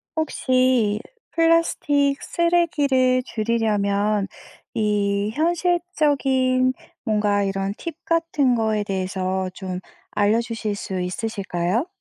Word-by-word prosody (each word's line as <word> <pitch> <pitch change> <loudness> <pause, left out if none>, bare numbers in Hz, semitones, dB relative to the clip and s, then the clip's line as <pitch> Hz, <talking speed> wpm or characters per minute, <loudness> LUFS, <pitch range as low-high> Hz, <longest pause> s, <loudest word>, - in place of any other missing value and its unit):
혹시 255 -8 +2 0.3
플라스틱 295 -4 +2
쓰레기를 290 -7 +2
줄이려면 210 -3 0 0.5
이 205 -1 +1
현실적인 295 -6 +1 0.3
뭔가 210 -3 +1
이런 195 0 -1
팁 335 -3 -6
같은 330 -6 +2
거에 220 -2 +1
대해서 190 -1 -2
좀 185 -1 -5 0.3
알려 210 +2 +2
주실 225 -3 -3
수 190 -2 -4
있으실까요? 190 - -2
225 Hz, 210 characters per minute, -23 LUFS, 200-285 Hz, 0.5 s, 혹시